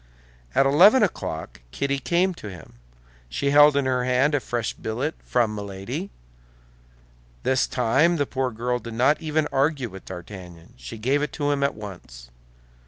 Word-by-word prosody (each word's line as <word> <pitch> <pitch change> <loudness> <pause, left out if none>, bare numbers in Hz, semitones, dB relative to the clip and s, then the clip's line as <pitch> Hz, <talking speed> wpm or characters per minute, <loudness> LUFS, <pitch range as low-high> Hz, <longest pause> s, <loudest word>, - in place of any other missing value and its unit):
At 135 - +5
eleven 190 - +6
o'clock 80 - -3
Kitty 140 - -1
came 175 +6 +1
to 110 -11 -9
him. 80 -9 -13 0.5
She 140 - -1
held 145 0 +7
in 140 - +1
her 130 -1 +1
hand 130 +4 +2
a 145 - +3
fresh 120 -3 -3
billet 125 +8 -3
from 120 -3 +1
Milady. 105 - -5 1.3
This 130 -1 +2
time 135 +8 +2
the 145 -3 0
poor 130 -1 -2
girl 125 +2 -2
did 115 0 -8
not 135 +7 +3
even 155 -1 0
argue 135 -2 +1
with 95 -1 -11
D'Artagnan; 90 -2 -10
she 60 - -9
gave 130 +6 +1
it 150 - -2
to 145 -1 -1
him 140 -1 0
at 140 - +1
once. 85 - -10
130 Hz, 165 wpm, -24 LUFS, 105-145 Hz, 1.3 s, held